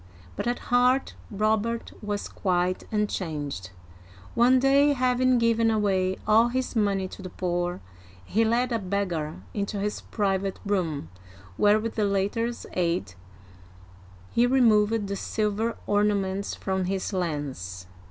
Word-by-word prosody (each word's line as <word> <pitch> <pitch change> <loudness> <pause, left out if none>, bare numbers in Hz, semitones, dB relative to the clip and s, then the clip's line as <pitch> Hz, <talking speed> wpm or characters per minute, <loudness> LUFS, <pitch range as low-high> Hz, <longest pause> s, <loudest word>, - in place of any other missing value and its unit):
But - - -3
at 240 - 0 0.2
heart 250 +2 +3 0.2
Robert 220 +2 0
was 205 -1 -3
quite 180 -1 -1
unchanged. 155 - -2 0.6
One 245 +2 +5
day, 275 +2 +4
having 255 -1 +2
given 230 -1 +3
away 190 -4 +1
all 220 +2 +5
his 255 +1 -2
money 200 -3 +1
to - - -10
the 185 - -6
poor, 175 0 -2 0.4
he 225 - +2
led 240 +3 +1
a 230 - +1
beggar 180 -6 -2 0.2
into 200 0 -2
his 210 +1 -2
private 195 -2 -1
room, 170 - -1 0.5
where, 210 - +4
with 225 +1 -3
the 215 - +1
latter's 205 +4 -1
aid, 170 - -1 1.2
he 240 +1 +3
removed 225 -4 +3
the 200 0 -3
silver 215 +3 -1
ornaments 200 -1 0
from 190 -1 -2
his 190 +2 -2
lance. 140 - -3
205 Hz, 130 wpm, -26 LUFS, 185-230 Hz, 1.2 s, One